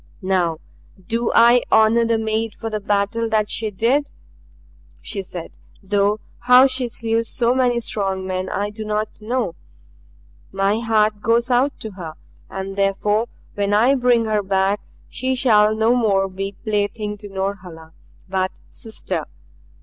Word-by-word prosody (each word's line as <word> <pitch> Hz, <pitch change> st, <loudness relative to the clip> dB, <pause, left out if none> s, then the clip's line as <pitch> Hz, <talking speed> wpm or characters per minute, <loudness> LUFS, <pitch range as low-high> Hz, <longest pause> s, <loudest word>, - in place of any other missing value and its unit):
"Now 180 Hz, -4 st, +1 dB, 0.5 s
do 230 Hz, +4 st, -1 dB
I 235 Hz, +1 st, +6 dB
honor 220 Hz, +2 st, +5 dB
the 230 Hz, 0 st, +2 dB
maid 220 Hz, 0 st, -2 dB
for 225 Hz, -1 st, -6 dB
the 215 Hz, -, -2 dB
battle 205 Hz, +3 st, 0 dB
that 215 Hz, -1 st, +1 dB
she 220 Hz, -1 st, 0 dB
did," 240 Hz, +9 st, +1 dB, 0.9 s
she 200 Hz, -, -4 dB
said, 180 Hz, -3 st, -9 dB, 0.2 s
"though 205 Hz, +2 st, +1 dB, 0.2 s
how 250 Hz, +1 st, +7 dB
she 255 Hz, -2 st, +1 dB
slew 230 Hz, -1 st, -1 dB
so 235 Hz, +1 st, +1 dB
many 250 Hz, -2 st, +2 dB
strong 195 Hz, -4 st, -2 dB
men 185 Hz, 0 st, -3 dB
I 205 Hz, +1 st, -2 dB
do 215 Hz, +1 st, -7 dB
not 215 Hz, 0 st, -3 dB
know. 230 Hz, -4 st, -2 dB, 1.0 s
My 195 Hz, +3 st, +1 dB
heart 215 Hz, -2 st, +1 dB
goes 235 Hz, +3 st, +1 dB
out 260 Hz, +3 st, +2 dB
to 220 Hz, -, -5 dB
her. 170 Hz, -5 st, -8 dB, 0.3 s
And 195 Hz, 0 st, -5 dB
therefore 205 Hz, +3 st, +1 dB, 0.3 s
when 205 Hz, 0 st, 0 dB
I 240 Hz, +6 st, +4 dB
bring 245 Hz, -3 st, +3 dB
her 215 Hz, -1 st, +1 dB
back 195 Hz, +1 st, +1 dB, 0.3 s
she 260 Hz, +1 st, -2 dB
shall 215 Hz, -4 st, +4 dB
no 220 Hz, +2 st, +3 dB
more 200 Hz, -5 st, +2 dB
be 195 Hz, +1 st, -5 dB
plaything 210 Hz, 0 st, -2 dB
to 205 Hz, -1 st, -10 dB
Norhala, 185 Hz, -5 st, -5 dB, 0.3 s
but 190 Hz, 0 st, 0 dB, 0.2 s
sister. 220 Hz, -1 st, -5 dB
215 Hz, 150 wpm, -21 LUFS, 195-230 Hz, 1.0 s, how